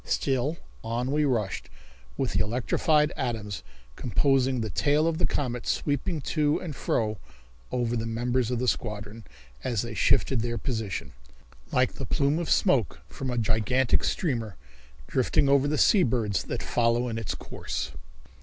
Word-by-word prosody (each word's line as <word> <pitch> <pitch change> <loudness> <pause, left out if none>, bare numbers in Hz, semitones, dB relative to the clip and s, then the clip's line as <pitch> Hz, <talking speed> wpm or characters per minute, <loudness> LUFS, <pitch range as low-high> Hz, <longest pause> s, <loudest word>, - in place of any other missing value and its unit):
Still 135 +4 0 0.3
on 120 +3 -2
we 150 +1 +2
rushed 110 -8 -1 0.5
with - - -1
the - - +3
electrified 150 +7 +2
atoms 110 -6 -3 0.3
composing 130 +2 +2
the 110 -2 -3
tail 150 - +2
of 165 0 0
the 175 - +3
comet 125 -4 -2
sweeping 150 +3 0
to 150 +1 +1
and 160 -5 -6
fro 110 -4 -1 0.5
over 120 -1 0
the 115 -1 -2
members 120 +1 0
of 125 - 0
the 125 +2 -1
squadron, 105 -1 -3 0.4
as 115 -4 0
they 115 -1 -5
shifted 120 +2 +3
their 120 0 -2
position, 110 -7 -3 0.6
like - - +2
the - - -6
plume 145 +3 +1
of 170 - -3
smoke 135 - +2
from 135 - -5
a 125 - -2
gigantic 115 +3 +2
steamer, 115 - -1 0.5
drifting 140 - +2
over 140 0 +4
the 150 +1 0
sea 200 - +5
birds 110 - +1
that 120 - -3
follow 120 +1 +1
in 115 -1 -2
its 115 - -3
course. - - -5
125 Hz, 155 wpm, -27 LUFS, 115-140 Hz, 0.6 s, sea